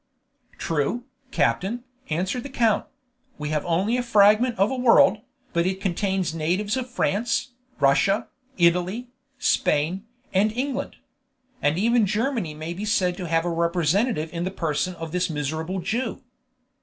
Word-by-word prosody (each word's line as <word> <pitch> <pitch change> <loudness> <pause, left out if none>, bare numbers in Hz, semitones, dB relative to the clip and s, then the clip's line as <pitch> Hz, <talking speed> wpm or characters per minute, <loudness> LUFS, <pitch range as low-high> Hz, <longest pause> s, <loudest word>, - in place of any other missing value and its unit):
"True, 165 +10 -1 0.3
captain," 190 - 0 0.3
answered 185 +10 -1
the 280 - -8
count; 230 -5 +1 0.5
"we 150 0 -4
have 150 -1 -1
only 190 +8 +1
a - - +1
fragment 220 +1 +4
of 195 +5 +3
a - - -1
world, 235 -4 +5 0.3
but 170 +1 +2
it 190 0 -2
contains 190 -2 -1
natives 180 +7 0
of 255 -1 -3
France, 240 +2 0 0.3
Russia, 170 +9 +3 0.3
Italy, 180 +7 +2 0.3
Spain, 165 - +1 0.3
and 200 +3 +3
England. 265 +2 -3 0.7
Even 210 +9 +3
Germany 215 - -1
may 155 +2 -5
be 190 +4 -6
said 185 -4 +1
to 180 -3 -5
have 165 +1 +1
a 175 - 0
representative 170 +2 +1
in 170 0 -2
the 185 - -1
person 180 0 -2
of 165 -1 -7
this 180 +1 0
miserable 160 +4 -3
Jew." 230 +8 -2
190 Hz, 145 wpm, -24 LUFS, 165-225 Hz, 0.7 s, world